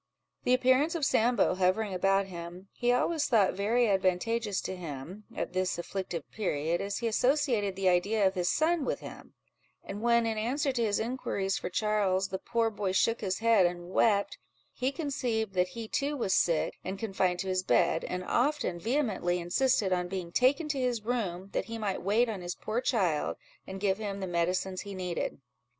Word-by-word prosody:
The 250 - +5
appearance 260 +6 +3
of 315 -4 0
Sambo 235 -6 +3
hovering 190 +3 +1
about 195 +2 +2
him, 175 +1 -9
he 245 0 +1
always 290 +5 +1
thought 215 -7 +3
very 225 +5 +2
advantageous 195 +2 +1
to 190 - -4
him, 170 +4 -8
at - - -3
this 185 -1 0
afflictive 175 -2 -4
period, 170 -5 -1
as 200 0 -3
he 235 - -1
associated 235 -4 +1
the 195 0 0
idea 200 +4 +3
of 190 - +3
his 180 -2 0
son 320 0 +2
with - - -2
him; - - -11 0.5
and 205 +2 -6
when, 235 0 +3
in 220 -1 -1
answer 270 +6 0
to 240 -3 0
his 205 -2 +1
inquiries 220 -5 -2
for - - -4
Charles, 195 -1 +1
the 190 - -3
poor 230 0 0
boy 205 -3 -2
shook 230 +4 +2
his 190 -3 -1
head, 225 -5 +4
and 175 0 -6
wept, 200 -1 +2 0.3
he 260 +1 -1
conceived 250 -8 -2
that 180 -1 +2
he 225 -1 -5
too 285 +5 -1
was 195 -7 0
sick, 165 -3 +1
and 190 +1 -4
confined 190 -4 0
to 195 - -5
his 185 0 +1
bed; 140 +1 +2
and 180 0 -3
often 245 - 0
vehemently 215 - 0
insisted 190 +3 +1
on 180 -1 0
being 180 -2 -5
taken 275 - +3
to 280 -2 -1
his 245 -4 -1
room, 200 -6 -2
that - - -1
he 230 0 -6
might 205 -4 -2
wait 215 +6 +2
on 210 -5 -4
his 175 0 -4
poor 220 +3 -2
child, 185 - 0 0.3
and 190 0 -6
give 195 0 +1
him 200 -2 -4
the 190 - -3
medicines 180 +2 -1
he 200 -1 -7
needed. 180 -5 -3
200 Hz, 190 wpm, -30 LUFS, 185-235 Hz, 0.5 s, The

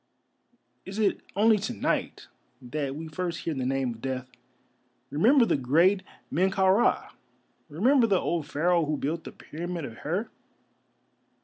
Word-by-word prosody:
Is 195 +2 -8
it 210 -3 +2 0.2
only 215 +1 +4
to 215 - -3
night - - -2 0.3
that 135 +1 -4
we 160 +2 -6
first 170 +2 -4
hear 165 - -2
the 130 -3 -2
name 135 -2 0
of 115 - -15
Death? 130 -1 -4 0.8
Remember 235 - +5
the - - +2
great 165 +9 +3 0.3
Men 185 +5 +2
kau 190 -1 +3
ra, 215 +5 +2 0.6
remember 235 - +3
the 195 -4 +3
old 165 -4 -2
Pharaoh 170 +3 +2
who 150 0 -1
built 160 +4 -3
the - - -7
Pyramid 170 0 -6
of 115 -3 -9
Hir. 180 +10 -3
170 Hz, 150 wpm, -27 LUFS, 145-195 Hz, 0.8 s, Remember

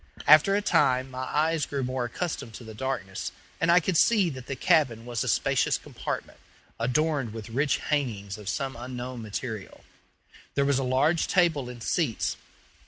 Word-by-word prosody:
After 155 +6 +7
a 205 - 0
time 130 -7 +2
my 130 0 -4
eyes 155 +1 +1
grew 140 -2 -2
more 130 0 -1
accustomed 120 -3 -4
to - - -9
the 110 -1 -9
darkness, 110 -5 -3 0.3
and 165 +2 +3
I 175 - +7
could 175 0 0
see 200 -2 +4
that 130 -2 -9
the 135 - -3
cabin 130 -7 +2
was 120 -2 -2
a - - -5
spacious - - +2
compartment, - - -6 0.4
adorned 135 0 0
with 110 0 -7
rich 140 +5 +1
hangings 110 -9 -2
of 105 -2 -6
some 135 -3 -2
unknown 125 0 -6
material. 110 -1 -6 0.7
There 140 - +2
was 140 -1 +2
a - - -1
large 135 +6 +2
table 160 -8 +2
and 120 -2 -9
seats. - - 0
130 Hz, 170 wpm, -27 LUFS, 120-155 Hz, 0.7 s, After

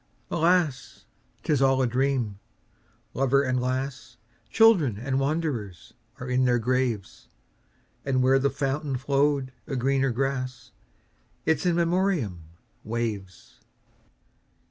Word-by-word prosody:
Alas! 165 -6 +1 0.4
't - - +1
is 140 - +1
all 135 -1 +4
a 130 - +3
dream. 125 -4 0 0.7
Lover 135 +2 +2
and 130 -2 0
lass, 130 -2 -3 0.3
Children 170 - +4
and 130 +4 -1
wanderers, 135 - -3 0.3
are 125 - -6
in 125 +1 +2
their 125 -1 +3
graves; 120 -3 -2 0.8
And 130 -2 +1
where 135 +1 +4
the 140 +1 +2
fountain 140 0 -2
flow'd 140 0 +1 0.2
a 135 - -3
greener 135 +1 +1
grass—Its 135 +5 -4
In 175 - +2
Memoriam—waves. 110 - -3
130 Hz, 105 wpm, -26 LUFS, 120-140 Hz, 0.8 s, all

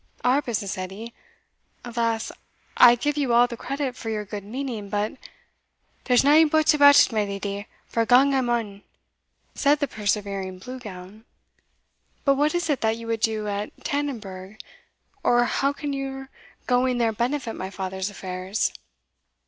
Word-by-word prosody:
"Our 255 +3 +3
business, 210 -7 -3
Edie? 195 +5 -7 0.7
Alas! 230 -2 -1 0.4
I 240 0 +8
give 295 +4 -2
you 270 -5 +1
all 240 +1 +6
credit 260 +2 -4
for 225 - -6
your 210 -1 -3
good 205 0 -6
meaning; 225 -2 -5
but" 205 +1 -1 0.9
"There's 250 0 +4
nae 300 +3 +6
buts 315 +1 +3
about 285 -1 +7
it, - - +5
my 215 -2 +1
leddy, 200 0 -5 0.2
for 230 - 0
gang 265 +3 +5
I 265 - +2
maun," 230 -5 -2 0.7
said 290 +1 +3
the 285 - -1
persevering 200 -3 -2
Blue 255 +7 -8
Gown. 205 0 -11 1.0
"But 275 - +5
what 295 +4 +1
is 345 -1 0
it 290 -4 0
that 220 0 +1
you 230 - -9
would 230 0 -2
do 215 -1 0
at 205 +1 -3
Tannonburgh? 215 -9 -4 0.7
or 240 0 +4
how 275 +3 +1
can 285 0 -5
your 270 -1 -5 0.4
going 250 0 +2
there 230 -2 +1
benefit 240 +1 -2
my 190 - -5
father's 190 0 -4
affairs?" 185 0 -3
230 Hz, 155 wpm, -24 LUFS, 205-270 Hz, 1.0 s, I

